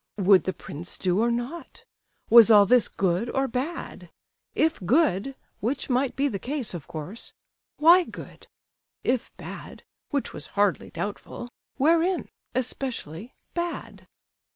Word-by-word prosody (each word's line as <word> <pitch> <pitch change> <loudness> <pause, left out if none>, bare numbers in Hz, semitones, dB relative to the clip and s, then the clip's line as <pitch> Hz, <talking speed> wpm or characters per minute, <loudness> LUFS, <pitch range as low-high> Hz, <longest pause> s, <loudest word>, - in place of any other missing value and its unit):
Would 195 -1 +5
the 185 - 0
prince 165 +2 -6
do 185 +1 +1
or 235 +2 +3
not? 240 +8 -5 0.4
Was 230 -1 +8
all 205 -2 +8
this 245 +2 +4
good 190 +5 0
or 270 0 0
bad? 265 +7 -5 0.5
If 320 0 +2
good 265 - +2 0.2
(which 255 +4 -2
might 255 +1 +1
be 280 +1 +1
the 200 -8 -3
case, 265 -2 -4
of 170 -5 -7
course), 165 +8 -8 0.4
why 345 +3 +7
good? - - -11 0.6
If 250 -1 0
bad - - -9 0.3
(which 280 -2 -2
was 150 - -8
hardly 205 -2 +2
doubtful), 210 +4 -6 0.3
wherein, 335 +6 +2 0.3
especially, 245 - -4 0.2
bad? 345 0 -5
240 Hz, 130 wpm, -26 LUFS, 200-280 Hz, 0.6 s, Was